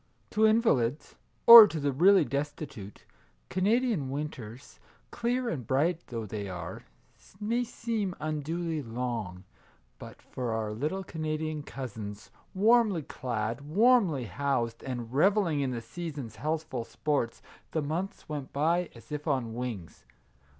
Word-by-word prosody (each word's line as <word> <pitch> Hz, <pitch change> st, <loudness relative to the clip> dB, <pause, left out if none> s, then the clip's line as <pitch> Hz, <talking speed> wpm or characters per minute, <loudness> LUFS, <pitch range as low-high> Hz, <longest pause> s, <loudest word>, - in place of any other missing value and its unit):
To 220 Hz, +1 st, +4 dB
invalids, 155 Hz, -, +1 dB, 0.3 s
or 230 Hz, -2 st, +13 dB
to 165 Hz, -, -4 dB
the 140 Hz, -1 st, 0 dB
really 180 Hz, +5 st, +5 dB
destitute, 140 Hz, -6 st, -5 dB, 0.4 s
Cana 200 Hz, +6 st, +2 dB
dian 215 Hz, -, -1 dB
winters, 130 Hz, -4 st, -7 dB, 0.3 s
clear 245 Hz, +1 st, -1 dB
and 130 Hz, -, -4 dB
bright 160 Hz, +6 st, +1 dB
though 115 Hz, -4 st, -5 dB
they 100 Hz, -1 st, -5 dB
are, 90 Hz, -2 st, -6 dB, 0.6 s
may 230 Hz, +4 st, 0 dB
seem 225 Hz, -5 st, -3 dB
unduly 155 Hz, +1 st, -2 dB
long; 115 Hz, -6 st, -4 dB, 0.6 s
but -, -, -11 dB
for 125 Hz, -3 st, -4 dB
our 110 Hz, -1 st, -2 dB
little 150 Hz, -, -2 dB
Canadian 155 Hz, -2 st, -3 dB
Cousins, 110 Hz, -7 st, -7 dB, 0.2 s
warmly 215 Hz, -4 st, +4 dB
clad, 115 Hz, -2 st, -3 dB
warmly 180 Hz, -, +3 dB
housed, 115 Hz, +1 st, -2 dB
and 120 Hz, -3 st, -5 dB
revelling 175 Hz, 0 st, +3 dB
in 135 Hz, -2 st, 0 dB
the 120 Hz, -2 st, -4 dB
season's 145 Hz, -5 st, -7 dB
healthful 155 Hz, -5 st, -2 dB
sports, 140 Hz, -2 st, -2 dB, 0.3 s
the 155 Hz, -, -1 dB
months 170 Hz, +7 st, -4 dB
went 145 Hz, -3 st, -5 dB
by 165 Hz, +4 st, +1 dB
as 115 Hz, +2 st, -15 dB
if 150 Hz, +1 st, -5 dB
on 130 Hz, -6 st, 0 dB
wings. 115 Hz, -, -6 dB
145 Hz, 130 wpm, -29 LUFS, 120-180 Hz, 0.6 s, or